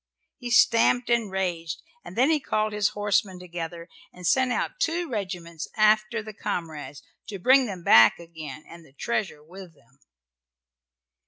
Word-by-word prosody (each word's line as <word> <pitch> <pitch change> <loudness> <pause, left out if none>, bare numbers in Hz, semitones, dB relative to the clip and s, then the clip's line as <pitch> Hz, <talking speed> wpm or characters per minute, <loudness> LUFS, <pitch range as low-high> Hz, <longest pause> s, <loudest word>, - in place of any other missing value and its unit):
He 245 - -6
stamped 240 +1 +4
and 235 -3 +1
raged, 175 - -3 0.2
and 175 - -11
then 260 +6 +3
he 310 - +2
called 215 -5 -1
his 210 -1 +2
horsemen 205 -2 0
together, 170 -1 -7 0.2
and 180 0 -11
sent 260 +6 +3
out 375 - -2
two 335 -1 0
regiments 180 - -5
after 215 +1 +3
the 215 0 -9
comrades 155 -7 -5 0.2
to 210 -2 -6
bring 255 +6 +4
them 185 -4 -7
back 115 -7 +7
again 160 -2 -10
and 170 0 -13
the 140 -4 -21
treasure 190 -3 -3
with 180 +1 -12
them. 130 +1 -28
190 Hz, 155 wpm, -25 LUFS, 170-230 Hz, 0.2 s, back